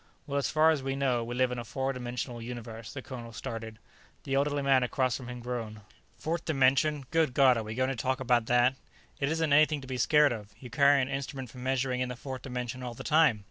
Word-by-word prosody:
"Well, 140 Hz, 0 st, -1 dB
as 140 Hz, -, -1 dB
far 155 Hz, +1 st, +5 dB
as 155 Hz, -4 st, 0 dB
we 135 Hz, 0 st, -2 dB
know, 130 Hz, -4 st, +1 dB
we 120 Hz, +1 st, -5 dB
live 130 Hz, 0 st, +2 dB
in 125 Hz, -, -3 dB
a -, -, -4 dB
four 135 Hz, +3 st, -2 dB
dimensional 125 Hz, -1 st, -5 dB
universe," 115 Hz, -2 st, -7 dB
the 135 Hz, -, -7 dB
colonel 120 Hz, -3 st, -8 dB
started. 115 Hz, 0 st, -6 dB, 0.5 s
The 135 Hz, -, -4 dB
elderly 140 Hz, +1 st, +1 dB
man 135 Hz, -1 st, +4 dB
across 130 Hz, 0 st, 0 dB
from 125 Hz, -, -7 dB
him 125 Hz, -1 st, -7 dB
groaned. 115 Hz, -3 st, -5 dB, 0.4 s
"Fourth 165 Hz, +1 st, -2 dB
dimension! 140 Hz, 0 st, +2 dB
Good 160 Hz, -6 st, +2 dB
God, 135 Hz, -3 st, +6 dB
are 115 Hz, -, -2 dB
we 110 Hz, +1 st, -6 dB
going 130 Hz, +1 st, +1 dB
to 135 Hz, -, -2 dB
talk 130 Hz, +3 st, -1 dB
about 120 Hz, -3 st, +2 dB
that?" 125 Hz, +1 st, +4 dB, 0.5 s
"It 140 Hz, -, 0 dB
isn't 160 Hz, -2 st, +1 dB
anything 155 Hz, 0 st, +5 dB
to -, -, -10 dB
be 130 Hz, -1 st, -3 dB
scared 150 Hz, +1 st, +5 dB
of. 105 Hz, -3 st, -7 dB
You 125 Hz, -2 st, -10 dB
carry 140 Hz, +2 st, +5 dB
an -, -, -2 dB
instrument 135 Hz, -2 st, -5 dB
for 125 Hz, -, -11 dB
measuring 130 Hz, 0 st, -1 dB
in 125 Hz, -, -1 dB
the 125 Hz, -, -5 dB
fourth 130 Hz, +1 st, -7 dB
dimension 125 Hz, -1 st, -5 dB
all 120 Hz, -2 st, -5 dB
the -, -, -8 dB
time. 155 Hz, -8 st, +4 dB
130 Hz, 240 wpm, -29 LUFS, 120-140 Hz, 0.5 s, God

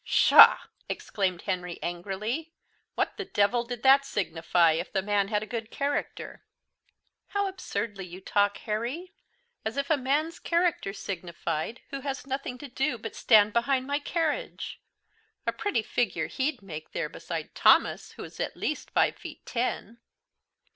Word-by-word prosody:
"Pshaw!" -, -, +8 dB, 0.3 s
exclaimed 185 Hz, -4 st, -2 dB
Henry 180 Hz, -2 st, -3 dB
angrily. 205 Hz, -, -3 dB, 0.4 s
"What -, -, -1 dB
the 400 Hz, -, -4 dB
devil 235 Hz, -, +2 dB
did 240 Hz, -1 st, -6 dB
that 270 Hz, +1 st, +7 dB
signify 170 Hz, -7 st, +2 dB
if 160 Hz, -, -2 dB
the 190 Hz, -2 st, 0 dB
man 205 Hz, -1 st, +1 dB
had 210 Hz, 0 st, 0 dB
a -, -, -5 dB
good 225 Hz, +1 st, -5 dB
character?" 285 Hz, +2 st, -3 dB, 0.8 s
"How 405 Hz, -1 st, 0 dB
absurdly 205 Hz, -, -4 dB
you 180 Hz, +1 st, -9 dB
talk, 205 Hz, +1 st, +1 dB
Harry, 240 Hz, +12 st, -3 dB, 0.5 s
as 220 Hz, +5 st, -3 dB
if 280 Hz, +2 st, -1 dB
a 310 Hz, -, +5 dB
man's 295 Hz, +6 st, 0 dB
character 340 Hz, -, +1 dB
signified 175 Hz, 0 st, -4 dB
who 275 Hz, -, -3 dB
has 270 Hz, -2 st, -4 dB
nothing 270 Hz, -2 st, -4 dB
to 290 Hz, -, -8 dB
do 265 Hz, 0 st, -1 dB
but 225 Hz, 0 st, -7 dB
to -, -, -9 dB
stand 210 Hz, -2 st, +5 dB
behind 260 Hz, +2 st, +1 dB
my 285 Hz, +1 st, 0 dB
carriage! 330 Hz, +10 st, -2 dB, 0.6 s
A -, -, +2 dB
pretty 410 Hz, -, -1 dB
figure 240 Hz, +2 st, 0 dB
he'd 270 Hz, -4 st, -2 dB
made 155 Hz, -5 st, -7 dB
there -, -, -1 dB
beside -, -, -6 dB
Thomas, -, -, +4 dB
who -, -, -8 dB
is -, -, -11 dB
at -, -, -3 dB
least 305 Hz, -, -3 dB
five -, -, +2 dB
feet -, -, -10 dB
ten!" 235 Hz, -2 st, -2 dB
235 Hz, 155 wpm, -28 LUFS, 195-280 Hz, 0.8 s, Pshaw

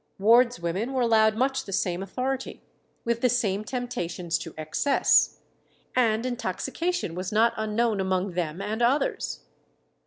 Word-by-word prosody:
Wards 235 Hz, +3 st, +4 dB
women 185 Hz, +10 st, -2 dB
were 255 Hz, -2 st, +1 dB
allowed 220 Hz, -2 st, +4 dB
much 265 Hz, +3 st, 0 dB
the 195 Hz, -, -8 dB
same 180 Hz, -1 st, -1 dB
authority, 255 Hz, +7 st, -4 dB, 0.4 s
with 235 Hz, 0 st, 0 dB
the 250 Hz, -, +4 dB
same 215 Hz, -4 st, 0 dB
temptations 195 Hz, -8 st, -3 dB
to 165 Hz, -, -8 dB
excess, 155 Hz, -, +2 dB, 0.6 s
and 230 Hz, -2 st, +2 dB
intoxication 255 Hz, -, -2 dB
was 185 Hz, +2 st, -4 dB
not 225 Hz, +2 st, +3 dB
unknown 220 Hz, 0 st, 0 dB
among 190 Hz, 0 st, 0 dB
them 175 Hz, +1 st, -3 dB
and 215 Hz, +3 st, -3 dB
others. 270 Hz, +4 st, 0 dB
220 Hz, 135 wpm, -26 LUFS, 190-245 Hz, 0.6 s, Wards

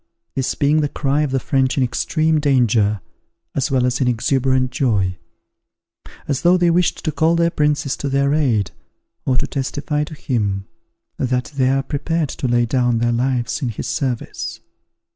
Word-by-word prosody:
this 130 Hz, -1 st, -1 dB
being 150 Hz, +2 st, +2 dB
the 145 Hz, -, 0 dB
cry 140 Hz, 0 st, 0 dB
of 150 Hz, -, 0 dB
the 135 Hz, 0 st, 0 dB
French 130 Hz, +1 st, 0 dB
in 135 Hz, -, +3 dB
extreme 155 Hz, +5 st, +1 dB
danger, 115 Hz, -8 st, +2 dB, 0.5 s
as 135 Hz, -, 0 dB
well 130 Hz, -2 st, +2 dB
as 125 Hz, +2 st, 0 dB
in 130 Hz, -, +2 dB
exuberant 130 Hz, +2 st, +1 dB
joy; 105 Hz, -8 st, +1 dB, 1.1 s
as 140 Hz, -2 st, -1 dB
though 175 Hz, +1 st, +5 dB
they 175 Hz, -1 st, +3 dB
wished 175 Hz, +1 st, +1 dB
to 155 Hz, -, +1 dB
call 160 Hz, +2 st, +2 dB
their 170 Hz, 0 st, +2 dB
princes 150 Hz, -3 st, 0 dB
to 140 Hz, -, -3 dB
their 140 Hz, +1 st, +2 dB
aid, 120 Hz, -, +1 dB, 0.6 s
or 130 Hz, -1 st, +2 dB
to -, -, +1 dB
testify 145 Hz, +2 st, -2 dB
to 155 Hz, +1 st, -8 dB
him 100 Hz, -9 st, -1 dB, 0.5 s
that 125 Hz, +1 st, -1 dB
they 130 Hz, -2 st, +2 dB
are 135 Hz, 0 st, +1 dB
prepared 155 Hz, +2 st, -1 dB
to 130 Hz, -, -3 dB
lay 120 Hz, 0 st, +2 dB
down 120 Hz, -1 st, +1 dB
their 120 Hz, +1 st, +1 dB
lives 125 Hz, +3 st, 0 dB
in 130 Hz, -, -1 dB
his 110 Hz, -, -5 dB
service. 130 Hz, -4 st, -3 dB
135 Hz, 175 wpm, -20 LUFS, 125-150 Hz, 1.1 s, though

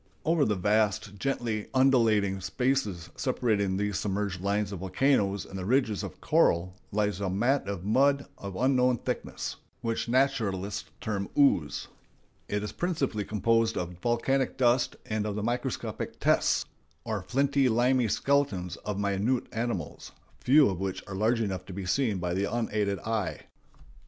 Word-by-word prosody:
Over 160 Hz, -3 st, +3 dB
the 105 Hz, -, +1 dB
vast, 105 Hz, +1 st, +1 dB
gently 115 Hz, -4 st, -2 dB
undulating 110 Hz, -7 st, +3 dB
spaces 105 Hz, -7 st, -1 dB
separating 105 Hz, -7 st, 0 dB
these 105 Hz, -1 st, -1 dB
submerged 100 Hz, -2 st, -2 dB
lines 100 Hz, +1 st, 0 dB
of 100 Hz, -, -5 dB
volcanoes 100 Hz, 0 st, +1 dB
and 95 Hz, -, -7 dB
the -, -, -4 dB
ridges 115 Hz, -1 st, +1 dB
of -, -, -7 dB
coral, 85 Hz, +2 st, +2 dB, 0.2 s
lies 105 Hz, -2 st, 0 dB
a 95 Hz, -, 0 dB
mat 120 Hz, +6 st, +1 dB
of 100 Hz, -3 st, -4 dB
mud 140 Hz, +6 st, +3 dB
of 100 Hz, -1 st, -7 dB
unknown 125 Hz, +1 st, +3 dB
thickness, -, -, -4 dB, 0.2 s
which 115 Hz, 0 st, -2 dB
naturalists 115 Hz, -7 st, 0 dB
term 100 Hz, -3 st, -2 dB
"ooze." 135 Hz, -, +3 dB, 0.6 s
It 105 Hz, 0 st, -2 dB
is 105 Hz, -, -4 dB
principally 145 Hz, -, -1 dB
composed 115 Hz, +2 st, +1 dB
of 90 Hz, 0 st, -2 dB
volcanic 130 Hz, +4 st, 0 dB
dust 125 Hz, 0 st, +2 dB
and 110 Hz, -1 st, -2 dB
of 105 Hz, -, -3 dB
the 105 Hz, -, -3 dB
microscopic 120 Hz, +2 st, -3 dB
"tests," -, -, +2 dB, 0.4 s
or 110 Hz, -3 st, -2 dB
flinty 135 Hz, +5 st, +2 dB
limy 120 Hz, +1 st, +3 dB
skeletons 105 Hz, -9 st, 0 dB
of 105 Hz, -2 st, -4 dB
minute 100 Hz, +5 st, 0 dB
animals, 110 Hz, -9 st, -4 dB, 0.3 s
few 140 Hz, +2 st, +5 dB
of 95 Hz, -3 st, -2 dB
which 95 Hz, -1 st, -3 dB
are 100 Hz, -, -8 dB
large 110 Hz, +4 st, +1 dB
enough 95 Hz, -4 st, -2 dB
to 95 Hz, -, -7 dB
be 95 Hz, 0 st, -5 dB
seen 110 Hz, +2 st, +1 dB
by 90 Hz, -1 st, -2 dB
the 100 Hz, +2 st, -1 dB
unaided 105 Hz, -4 st, 0 dB
eye. 110 Hz, -3 st, -2 dB
105 Hz, 150 wpm, -28 LUFS, 100-125 Hz, 0.6 s, few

